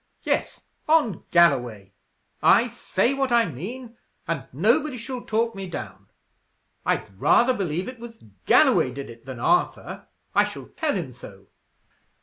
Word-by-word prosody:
Yes, -, -, -1 dB, 0.3 s
on 295 Hz, -, +2 dB
Galloway. 125 Hz, -, +2 dB, 0.5 s
I 240 Hz, -, +5 dB
say 240 Hz, +2 st, 0 dB
what 270 Hz, -2 st, -1 dB
I 235 Hz, -1 st, +4 dB
mean, 230 Hz, -, -8 dB, 0.3 s
and 155 Hz, -5 st, -3 dB
nobody 250 Hz, -, +1 dB
shall 250 Hz, +1 st, -6 dB
talk 230 Hz, +1 st, -1 dB
me 195 Hz, -2 st, -6 dB
down. 100 Hz, -, -8 dB, 0.8 s
I'd 95 Hz, -, -2 dB
rather 255 Hz, -, +4 dB
believe 180 Hz, -4 st, -2 dB
it 255 Hz, -2 st, -8 dB
was 235 Hz, 0 st, -9 dB, 0.3 s
Galloway -, -, +5 dB
did 135 Hz, -1 st, -7 dB
it 115 Hz, +2 st, -16 dB
than 130 Hz, -3 st, -7 dB
Arthur. 355 Hz, -, 0 dB, 0.3 s
I -, -, +4 dB
shall -, -, -9 dB
tell 315 Hz, -2 st, -2 dB
him 165 Hz, -9 st, -4 dB
so." 100 Hz, -5 st, -14 dB
195 Hz, 140 wpm, -24 LUFS, -, 0.8 s, I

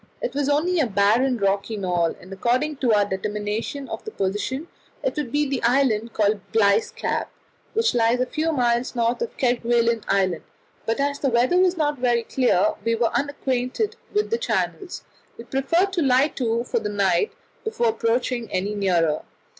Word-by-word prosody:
It -, -, -3 dB
was 285 Hz, 0 st, 0 dB
only 330 Hz, +5 st, +2 dB
a 285 Hz, -, +2 dB
barren 225 Hz, +6 st, +2 dB
rocky 200 Hz, +1 st, 0 dB
knoll, 175 Hz, -4 st, 0 dB
and 185 Hz, +1 st, -11 dB
according 255 Hz, +9 st, 0 dB
to 250 Hz, -4 st, +1 dB
our 205 Hz, -1 st, +4 dB
determination 210 Hz, +7 st, -3 dB
of -, -, -6 dB
the -, -, -5 dB
position 260 Hz, -, -2 dB, 0.4 s
it -, -, -1 dB
would 295 Hz, -6 st, -3 dB
be 295 Hz, +1 st, +1 dB
the 270 Hz, -1 st, -2 dB
island 235 Hz, -3 st, +2 dB
called 210 Hz, -1 st, +2 dB
Bligh's 205 Hz, -1 st, +3 dB
Cap, 475 Hz, +1 st, -3 dB, 0.5 s
which 450 Hz, +1 st, +2 dB
lies 235 Hz, +1 st, +2 dB
a 255 Hz, -, +2 dB
few 310 Hz, +5 st, -1 dB
miles 245 Hz, -3 st, 0 dB
north 235 Hz, 0 st, 0 dB
of 470 Hz, -, -4 dB
Kerguelen 235 Hz, -2 st, +2 dB
Island; 185 Hz, -4 st, +1 dB, 0.5 s
but 225 Hz, +3 st, 0 dB
as 280 Hz, 0 st, 0 dB
the 275 Hz, -, +1 dB
weather 250 Hz, +9 st, +3 dB
was 365 Hz, -1 st, +3 dB
not 295 Hz, -3 st, 0 dB
very 240 Hz, -2 st, +2 dB
clear, 230 Hz, -6 st, +2 dB
and -, -, -26 dB
we 230 Hz, 0 st, +1 dB
were 230 Hz, 0 st, 0 dB
unacquainted 280 Hz, -, -1 dB, 0.2 s
with 420 Hz, +1 st, 0 dB
the 460 Hz, -, +1 dB
channels, 390 Hz, -6 st, -2 dB, 0.3 s
we 230 Hz, -, -8 dB
preferred 330 Hz, +10 st, +1 dB
to 355 Hz, -, 0 dB
lie 270 Hz, +1 st, +4 dB
to 235 Hz, -4 st, -1 dB
for -, -, -1 dB
the 210 Hz, -, -3 dB
night 205 Hz, -, +1 dB, 0.3 s
before 340 Hz, -, 0 dB
approaching 230 Hz, +1 st, -1 dB
any 195 Hz, +3 st, -1 dB
nearer. 175 Hz, -6 st, +1 dB
240 Hz, 180 wpm, -23 LUFS, 210-285 Hz, 0.5 s, our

